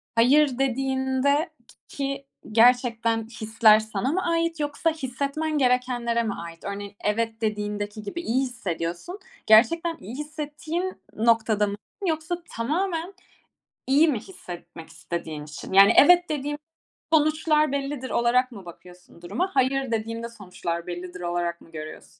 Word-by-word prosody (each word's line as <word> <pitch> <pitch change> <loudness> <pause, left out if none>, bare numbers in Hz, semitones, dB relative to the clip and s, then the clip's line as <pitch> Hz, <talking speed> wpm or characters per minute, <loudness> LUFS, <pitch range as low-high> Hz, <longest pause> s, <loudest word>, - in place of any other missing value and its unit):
hayır 265 +3 +4
dediğinde 265 +3 +1 0.2
k - - -18
ki 275 0 -4 0.3
gerçekten 230 -1 +3
hisler 220 -1 +4
sana 220 +4 -2
mı 375 +3 -1
ait 335 -1 0
yoksa 295 +3 0
hissetmen 295 +2 -2
gerekenlere 250 -2 +1
mi 215 -3 -2
ait? 170 0 -9
Örneğin, 200 0 -6
evet 225 +1 -1
dediğindeki 210 0 -3
gibi 275 +12 -5
iyi 255 -2 +1
hissediyorsun, 215 - -4 0.3
gerçekten 325 +10 +5
iyi 215 +7 -8
hissettiğin 310 +4 -4 0.2
noktada 220 -2 +3
mı 200 - -3 0.3
yoksa 320 +2 -1
tamamen 335 +8 -2 0.7
iyi 290 +5 +5
mi 255 -7 +1
hissetmek 175 - -10
istediğin 165 -2 -6
için? 150 +2 -9
Yani, 195 +1 +8
“Evet 355 +4 +7
dediğim 295 0 -2 0.6
sonuçlar 305 -1 +3
bellidir.” 275 -2 -3
olarak 250 +2 +2
mı 195 -5 -11
bakıyorsun 175 0 -14
duruma, 355 - -2
“Hayır 265 -1 +1
dediğimde 230 +1 -3
sonuçlar 180 -6 -5
bellidir.“ 180 +1 -6
olarak 175 0 -2
mı 165 - -18
görüyorsun? 155 -1 -9
240 Hz, 130 wpm, -25 LUFS, 205-295 Hz, 0.7 s, Yani